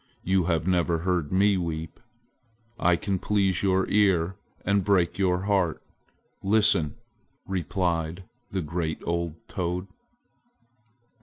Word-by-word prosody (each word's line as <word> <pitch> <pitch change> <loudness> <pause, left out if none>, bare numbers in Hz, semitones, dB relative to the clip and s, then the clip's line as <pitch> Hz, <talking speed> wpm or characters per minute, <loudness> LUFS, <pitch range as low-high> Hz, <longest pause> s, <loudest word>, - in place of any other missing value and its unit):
You 95 -1 +2
have 85 -2 0
never 85 -2 +2
heard 90 -5 0
me 100 +1 +4
weep. 80 -2 -4 0.8
I 90 -3 +4
can 95 +2 -2
please 95 -3 +1
your 95 -1 +2
ear 95 -3 +2 0.3
and 100 0 +2
break 95 -2 +2
your 90 -1 +2
heart. 95 -5 +1 0.6
Listen!" 100 -7 +3 0.5
replied 90 -1 -1 0.3
the 95 -2 -2
great 80 0 -3
old 85 -1 -1
toad. 90 0 -2
90 Hz, 110 wpm, -26 LUFS, 85-95 Hz, 0.8 s, me